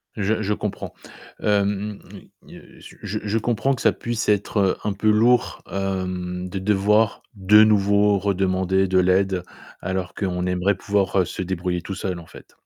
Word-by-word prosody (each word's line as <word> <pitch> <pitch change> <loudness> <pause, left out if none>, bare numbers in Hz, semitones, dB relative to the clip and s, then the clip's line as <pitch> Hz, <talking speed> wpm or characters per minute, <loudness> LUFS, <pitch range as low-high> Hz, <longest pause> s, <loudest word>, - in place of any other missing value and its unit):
Je 110 +1 0
je 105 +1 0
comprends. 105 -1 -5 0.5
Hem, 100 0 0 0.5
heu, - - -15
se - - -13
je 105 - -4
je 105 +1 -1
comprends 120 +4 0
que 130 - -6
ça - - +4
puisse 115 -2 -3
être, 105 +1 0
heu, 95 -2 +2
un 105 - -1
peu 105 +2 0
lourd, 115 +3 +3
hem, 90 -2 -3
de 95 - -4
devoir 105 +3 +2
de 105 +1 +6
nouveau 100 -1 +3
redemander 95 -1 +1
de 95 0 +2
l'aide 95 0 +2 0.4
alors 95 0 -3
qu'on 90 -3 -2
aimerait 90 +2 +1
pouvoir, 100 0 0
heu, - - 0
se - - -6
débrouiller 90 -1 -2
tout 95 - -6
seul 90 -2 -4
en 85 - -13
fait. - - -15
100 Hz, 170 wpm, -22 LUFS, 95-105 Hz, 0.5 s, de